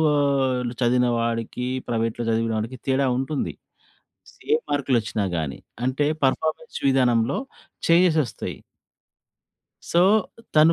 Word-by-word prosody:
ఆహ్, 135 -3 +2 0.2
చదివిన 125 +1 +3
వాడికి, 115 +1 -2 0.2
ప్రైవేట్‌లో 115 0 -1
చదివిన 115 0 0
వాడికి 115 +4 -5
తేడా 135 0 +2
ఉంటుంది. 135 +2 -2 1.0
ఏ - - +6 0.2
మార్కులొచ్చినా 120 -8 0
గాని. 75 -4 -3 0.3
అంటే 130 +3 +1 0.2
పర్‌ఫా‌మె‌న్స్ 155 - 0
విధానంలో 125 -2 +3 0.5
చెంజెస్ 170 -1 +5
వస్తాయి. 120 - -6 1.3
సో, 170 - +4 0.5
తను 155 +2 +6
130 Hz, 100 wpm, -24 LUFS, 115-140 Hz, 1.3 s, ఏ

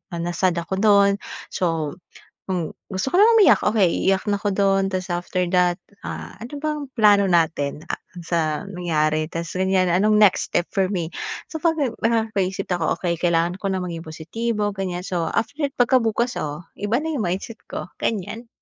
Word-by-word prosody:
na-sad 175 +1 0
ako 170 +3 -3
dun. 200 -2 +6 0.4
So, 165 -5 0 0.6
kung 180 -4 -2 0.2
gusto 190 +6 -2
ko - - 0
na 445 +3 +7
umiyak, 410 - +6
okey, 210 -5 +2
iiyak 190 -1 +3
na 205 - +2
ako 205 0 -1
dun 195 -1 +3
tas 185 0 -2
after 175 +1 -1
that, 180 -1 +3 0.3
ah, - - -6
ano 235 +5 -9
bang 305 -1 -2
plano 205 -3 +5
natin? 155 -3 +1
Ah, - - 0 0.3
sa 170 0 0 0.3
nangyari? 155 -4 0
Tas 165 +1 -5
ganyan, 190 0 +2
anong 210 +5 +3
next 205 -3 +4
step 175 - +1
for 195 -3 +1
me? 175 -5 -1 0.4
So, 320 - -4
pag 330 -1 +3 0.3
nakakapag-isip 215 -4 0
ako, 175 -3 0
okey 175 -2 0
kailangan 170 0 +1
ko 200 - -2
nang 185 -1 -1
maging 165 -1 -6
positibo, 205 +7 -2
ganyan, 180 -2 -3
so 175 -3 -1
after, 285 +7 -2 0.2
pagkabukas, 240 -1 +2
oh, 150 +2 -4 0.2
iba 210 +5 +1
na 320 +1 -3
yung 230 - -1
mindset 195 +6 -4
ko, - - -4
ganyan. 225 +3 -3
190 Hz, 170 wpm, -22 LUFS, 170-215 Hz, 0.6 s, na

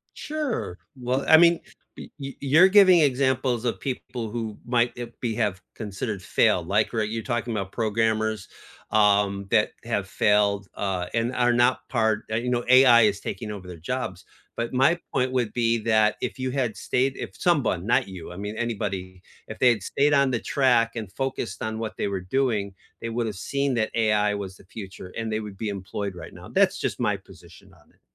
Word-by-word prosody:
Sure. 295 - -3 0.2
Well, 130 +2 -1
I 160 - +9
mean, 170 +1 +5 0.4
y - - -9
y 135 0 -6
you're 155 +7 +6
giving 190 -3 +7
examples 130 -3 +1
of 120 - -1
people 125 -4 -5
who 110 -2 -5
might, 120 0 +1
uh, 120 - -4
be 115 -3 -2
have 105 -5 -1
considered 105 -1 -5
failed, 90 -1 +2
like, 105 +5 +1
r 110 -2 0
you're 110 +1 -3
talking 120 -1 -2
'bout 100 -2 -4
programmers, 110 -2 0 0.4
um, 100 -2 +3
that 110 -2 +3
have 100 -5 -2
failed, 100 -1 +2
uh, 95 -3 -2
and 115 +2 0
are 120 -1 +3
not 120 +1 +2
part 110 -3 +1
eh, 110 - 0
you 125 +1 -2
know, 120 -1 0
AI 130 -2 +7
is 105 -2 +2
taking 110 -3 -5
over 100 -3 -7
their 90 - -8
jobs, 80 - -4 0.3
but 115 0 -3
my 155 +7 +4
point 130 -1 0
would 120 -4 0
be 115 -1 +1
that 110 -1 +2
if - - -4
you 130 0 -2
had 125 -5 -1
stayed, 130 +1 0
if - - -6
someone, 125 - +1
not 125 -1 +2
you, 90 -2 -9
I - - -9
mean 105 +2 -5
anybody, 100 -6 -4 0.3
if 110 - -8
they 125 - +6
had 110 -5 0
stayed 145 +7 +1
on 140 -2 +4
the 120 - 0
track 125 -5 +2
and 105 -4 -5
focused 130 -8 -4
on 110 0 -3
what 110 -1 -5
they - - -1
were 95 -2 -3
doing, 105 -1 -1 0.3
they 115 - -4
woulda 115 -2 -2
seen 140 +8 -2
that 110 -2 0
AI 105 -2 +2
was 95 -2 -6
the - - -18
future 95 -2 -9
and 115 -1 -3
they 110 - -1
would 105 -2 -8
be 110 +1 -4
employed 100 0 -4
right - - -9
now, - - -12
that's - - +2
just - - -2
my - - +1
position - - -17
on - - -25
it. - - -34
115 Hz, 200 wpm, -25 LUFS, 100-125 Hz, 0.4 s, I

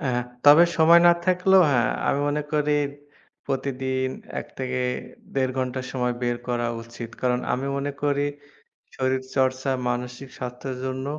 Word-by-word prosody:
অ্যা 135 -5 -1 0.3
তবে 150 +4 +9
সময় 170 +1 +7
না 175 - +8
থাকলেও 185 +1 +5
হ্যাঁ 120 -4 +2 0.2
আমি 140 - +2
মনে 150 +1 0
করি 150 0 +2 0.7
প্রতিদিন 130 -1 -1 0.3
১ - - -9
থেকে 130 -1 -2 0.5
১.৫ 130 -1 +1
ঘণ্টা 130 0 -1
সময় 125 -2 -1
বের 120 0 0
করা 120 -1 0 0.2
উচিত। 115 0 -9
কারণ 125 -1 +1
আমি 130 +2 -1
মনে 140 +1 -2
করি 145 0 +1 0.7
শরীর 130 0 0
চর্চা 130 0 +1 0.2
মানসিক 125 +2 -4
স্বাস্থ্যের 125 +1 -5
জন্য 130 +1 -3
130 Hz, 145 wpm, -24 LUFS, 125-145 Hz, 0.7 s, তবে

